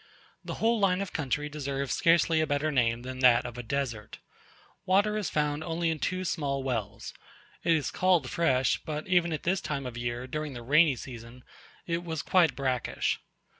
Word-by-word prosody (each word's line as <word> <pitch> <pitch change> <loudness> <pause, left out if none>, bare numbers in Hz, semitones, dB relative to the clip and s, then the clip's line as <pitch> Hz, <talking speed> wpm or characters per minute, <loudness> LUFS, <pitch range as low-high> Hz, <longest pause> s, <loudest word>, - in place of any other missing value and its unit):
The - - -5
whole 230 0 +2
line 190 -2 +2
of 200 - -4
country 145 0 -1
deserves 140 -2 -3
scarcely 165 -2 +3
a 155 - 0
better 145 +1 0
name 120 -3 +1
than 130 0 -6
that 125 -2 +5
of 120 - -6
a 125 - -5
desert. 120 -3 -4 0.7
Water 205 +3 +2
is 210 -4 -1
found 150 0 -1
only 165 0 -1
in 160 - -3
two 185 +5 -2
small 140 -5 -1
wells; 115 -6 -4 0.5
it 170 - +4
is 155 -4 0
called 180 -7 +2
fresh; 130 -5 +1
but 155 -1 -4
even 175 -2 +2
at 155 - -3
this 185 +1 +1
time 140 -3 -3
of 125 - -5
the 120 - -6
year, 120 +1 -3
during 155 +2 -4
the 120 -1 -8
rainy 150 +3 +4
season, 120 0 -10 0.4
it 170 0 -2
was 160 -3 -4
quite 180 -4 +3
brackish. 130 -3 -1
150 Hz, 190 wpm, -28 LUFS, 130-170 Hz, 0.7 s, that